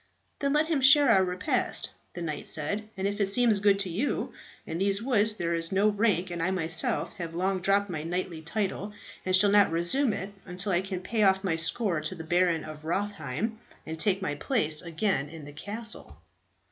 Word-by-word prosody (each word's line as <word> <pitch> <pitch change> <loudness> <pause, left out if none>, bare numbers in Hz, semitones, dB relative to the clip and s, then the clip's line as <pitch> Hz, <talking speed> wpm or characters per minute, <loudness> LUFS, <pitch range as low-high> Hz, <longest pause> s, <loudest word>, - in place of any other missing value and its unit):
"Then 280 0 0
let 300 +1 +3
him 315 -4 0
share 280 +1 +7
our 190 -3 +5
repast," 180 0 0 0.2
the 175 - -5
knight 155 -3 -5
said, 205 +8 -2
"if 200 +2 -2
it 200 - +2
seems 225 -1 +3
good 200 -1 +3
to 190 - -3
you. 225 +12 -2 0.3
In 165 - -5
these 195 +1 +3
woods 220 -3 +1
there 170 -4 -2
is 165 0 0
no 200 +2 +3
rank, 205 -4 0
and 175 -1 -4
I 175 - +1
myself 165 -3 0
have 165 -3 -6
long 185 +1 -1
dropped 200 +2 +2
my 165 -5 -4
knightly 170 0 -4
title, 200 +3 -3 0.3
and 185 - +4
shall 200 +2 +5
not 205 -4 +5
reassume 175 +11 +3
it 195 +1 -6
until 185 +3 -2
I 175 0 +2
can 190 -1 -5
pay 220 +4 -2
off 190 -1 +3
my 180 -4 0
score 170 +1 0
to 155 +4 -4
the 165 - -8
Baron 170 0 +1
of 155 0 -10
Rotherheim, 200 - -3 0.3
and 160 0 -6
take 195 +2 +3
my 145 - -1
place 155 - +3
again 165 -4 -1
in 160 -2 -10
my 145 - -10
castle." 210 +9 -4
190 Hz, 200 wpm, -27 LUFS, 165-210 Hz, 0.3 s, share